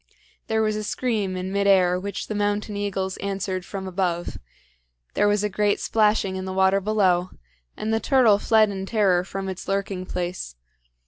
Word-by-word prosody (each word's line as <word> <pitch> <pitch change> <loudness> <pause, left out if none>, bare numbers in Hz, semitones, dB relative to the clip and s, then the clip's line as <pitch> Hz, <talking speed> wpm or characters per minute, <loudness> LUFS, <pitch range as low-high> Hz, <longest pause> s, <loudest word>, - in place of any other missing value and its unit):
There 220 0 +1
was 215 -1 0
a 215 - -3
scream 210 -5 -1
in 185 +1 -4
mid 200 0 +1
air 180 -2 +4
which 200 +2 -5
the - - -5
mountain 205 0 -1
eagles 195 -2 -2
answered 195 -1 -3
from 190 +1 -6
above; 180 -2 -2 0.7
there 205 - +2
was 205 0 +2
a - - +2
great 205 +1 +1
splashing 210 -3 +1
in 185 - -4
the 190 - -4
water 190 +1 +3
below, 185 -3 +2 0.5
and 220 +1 -2
the 225 - +2
turtle 235 -6 +4
fled 215 -1 +3
in 190 -1 -5
terror 195 -5 +2
from 195 +1 -5
its 190 -1 -6
lurking 195 -1 -2
place. 175 - -4
195 Hz, 180 wpm, -24 LUFS, 185-210 Hz, 0.7 s, air